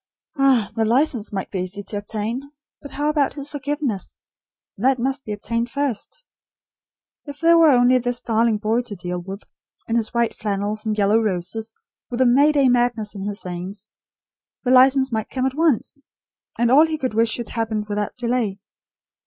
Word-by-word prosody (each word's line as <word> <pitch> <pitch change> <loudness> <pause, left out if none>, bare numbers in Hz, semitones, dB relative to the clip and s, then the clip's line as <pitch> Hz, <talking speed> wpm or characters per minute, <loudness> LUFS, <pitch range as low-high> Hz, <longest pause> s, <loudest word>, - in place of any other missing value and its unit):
Ah, 270 -6 +3
the 225 - +1
license 240 -1 +2
might 195 -2 -4
be 190 - -2
easy 185 +3 -5
to 205 +1 -5
obtain; 225 +7 -4 0.3
but 285 - -9
how 290 +2 -2
about 300 -2 +1
his 285 -1 -6
forgiveness? 285 -7 -3 0.6
That 260 +6 +2
must 265 +2 -2
be 215 - -7
obtained 230 +3 -2
first. 280 - -3 1.0
If 285 -1 -9
there 335 0 +5
were 330 -2 +6
only 250 -1 +5
this 245 0 -2
darling 225 -1 +2
boy 220 +3 0
to 240 -4 -8
deal 180 0 -4
with, 195 +3 -8 0.4
in 225 - -1
his 225 -2 -1
white 235 -1 +1
flannels 210 +1 -3
and 215 -1 -1
yellow 210 +2 +3
roses, 215 +2 -3 0.3
with 240 - -4
a 260 - +4
May 275 +5 +5
Day 280 -3 +3
madness 240 -3 +1
in 195 -2 -6
his 205 -1 -4
veins, 185 +4 -7 0.7
the 250 - +1
license 265 +1 +5
might 220 -2 -2
come 260 -1 -2
at 265 - 0
once; 300 -3 +1 0.6
and 235 0 +2
all 300 +5 +7
he 315 -1 -2
could 260 -6 -3
wish 225 +1 +2
should 235 0 -4
happen 220 -2 -2
without 205 0 -3
delay. 235 -5 -1
235 Hz, 180 wpm, -22 LUFS, 210-265 Hz, 1.0 s, all